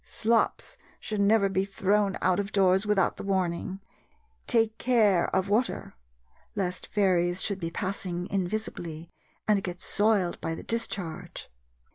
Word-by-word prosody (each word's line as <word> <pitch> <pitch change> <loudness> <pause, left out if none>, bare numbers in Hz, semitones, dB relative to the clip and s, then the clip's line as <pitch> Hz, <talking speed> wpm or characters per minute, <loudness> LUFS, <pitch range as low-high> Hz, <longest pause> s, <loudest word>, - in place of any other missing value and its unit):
Slops 230 - 0 0.2
should 210 -2 -2
never 200 0 +4
be 190 0 0
thrown 200 0 +1
out 185 +2 +3
of 200 +1 -3
doors 190 0 +3
without 200 -3 +2
the - - -6
warning, 190 -1 -1 0.7
"Take 225 -2 +2
care 215 -8 +3
of 190 0 0
water!" 220 +5 0 0.6
lest 185 -3 -2
fairies 180 -3 +2
should 200 -2 -1
be 165 -2 -3
passing 180 -1 -3
invisibly 175 -4 -3 0.4
and 205 -2 +3
get 180 -1 -5
soiled 205 -5 +1
by 165 - -2
the - - -8
discharge. 195 -7 -4
195 Hz, 135 wpm, -28 LUFS, 180-210 Hz, 0.7 s, never